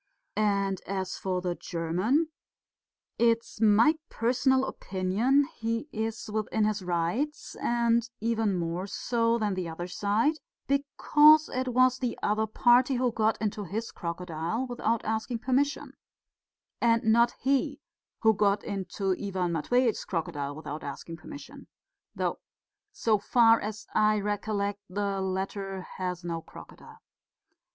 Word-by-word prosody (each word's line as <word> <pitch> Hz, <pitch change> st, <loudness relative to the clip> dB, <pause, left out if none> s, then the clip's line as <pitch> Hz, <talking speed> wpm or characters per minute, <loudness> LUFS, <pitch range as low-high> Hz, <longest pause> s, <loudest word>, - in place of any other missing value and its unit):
And 200 Hz, -2 st, +1 dB
as 190 Hz, -1 st, -3 dB
for 185 Hz, -1 st, -1 dB
the 180 Hz, -1 st, -1 dB
German, 185 Hz, -, 0 dB, 0.9 s
it's 230 Hz, -1 st, +1 dB
my 225 Hz, +9 st, +5 dB
personal 260 Hz, +3 st, +2 dB
opinion 205 Hz, +9 st, +1 dB
he 230 Hz, +3 st, -2 dB
is 220 Hz, +1 st, -3 dB
within 215 Hz, 0 st, 0 dB
his 210 Hz, -1 st, 0 dB
rights, 180 Hz, -, -2 dB
and 235 Hz, 0 st, +1 dB
even 225 Hz, -3 st, 0 dB
more 170 Hz, +2 st, -2 dB
so 230 Hz, +2 st, 0 dB
than 210 Hz, -3 st, 0 dB
the 185 Hz, -2 st, -3 dB
other 165 Hz, +2 st, -5 dB
side, 210 Hz, -, 0 dB, 0.3 s
because 295 Hz, +2 st, +5 dB
it 255 Hz, 0 st, -2 dB
was 255 Hz, +1 st, +3 dB
the 250 Hz, -2 st, -2 dB
other 215 Hz, +1 st, +1 dB
party 245 Hz, +4 st, +4 dB
who 250 Hz, 0 st, +1 dB
got 220 Hz, -1 st, +1 dB
into 210 Hz, 0 st, -2 dB
his 215 Hz, +5 st, -4 dB
crocodile 170 Hz, +6 st, -3 dB
without 235 Hz, -2 st, -1 dB
asking 220 Hz, +2 st, -1 dB
permission, 270 Hz, +5 st, 0 dB, 0.9 s
and 230 Hz, -1 st, +3 dB
not 235 Hz, +2 st, +4 dB
he 280 Hz, +2 st, +1 dB, 0.4 s
who 220 Hz, -1 st, +5 dB
got 205 Hz, 0 st, +2 dB
into 195 Hz, -1 st, -2 dB
Ivan 185 Hz, -3 st, -1 dB
Matveitch's 235 Hz, +8 st, +1 dB
crocodile 155 Hz, -5 st, -3 dB
without 150 Hz, 0 st, -7 dB
asking 145 Hz, +4 st, -7 dB
permission, 290 Hz, -, -11 dB, 0.5 s
though, -, -, -1 dB, 0.5 s
so 220 Hz, -, +1 dB
far 230 Hz, +1 st, +5 dB
as 215 Hz, 0 st, -5 dB
I 215 Hz, 0 st, +3 dB
recollect, 205 Hz, 0 st, -2 dB
the 200 Hz, 0 st, -2 dB
latter 190 Hz, 0 st, -3 dB, 0.2 s
has 180 Hz, -1 st, -3 dB
no 165 Hz, -1 st, -3 dB
crocodile. -, -, -13 dB
215 Hz, 130 wpm, -28 LUFS, 190-240 Hz, 0.9 s, my